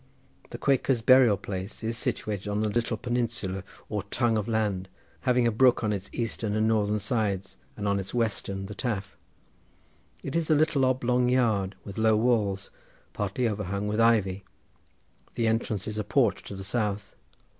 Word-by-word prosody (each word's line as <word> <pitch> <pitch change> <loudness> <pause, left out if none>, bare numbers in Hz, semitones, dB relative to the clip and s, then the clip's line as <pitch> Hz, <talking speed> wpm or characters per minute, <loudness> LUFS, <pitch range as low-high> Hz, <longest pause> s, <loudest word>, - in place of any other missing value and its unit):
The - - -6
Quakers' 135 -3 +1
burying 130 -4 +6
place 95 +2 -6
is 115 +1 -1
situated 105 -3 -3
on 105 +1 0
a - - 0
little 115 +2 -1
peninsula 115 -6 -2 0.2
or 105 -2 -2
tongue 115 +3 0
of 105 0 -1
land, 105 -4 -1 0.4
having 125 -1 +4
a 115 - +3
brook 120 +2 +4
on 105 -1 +1
its 100 0 -5
eastern 110 -2 -2
and 110 0 +2
northern 105 -1 +2
sides, 100 -2 -1 0.2
and 105 - -2
on 100 0 +2
its 95 0 -6
western 100 -4 -1
the 105 - -7
Taf. 105 -4 -3 1.1
It 140 - -4
is 165 -1 0
a 155 - +5
little 150 -3 +3
oblong 125 -1 +2
yard, 110 -6 +1
with 100 +1 -7
low 110 0 +4
walls, 105 -4 +1 0.4
partly 105 +5 -1
overhung 100 -1 -2
with 105 +2 +1
ivy. 100 -4 +3 0.9
The 115 - 0
entrance 110 -3 0
is 110 0 -3
a - - -1
porch 115 +1 +2
to 100 - -7
the 95 - -7
south. 105 -1 -2
110 Hz, 170 wpm, -27 LUFS, 100-120 Hz, 1.1 s, burying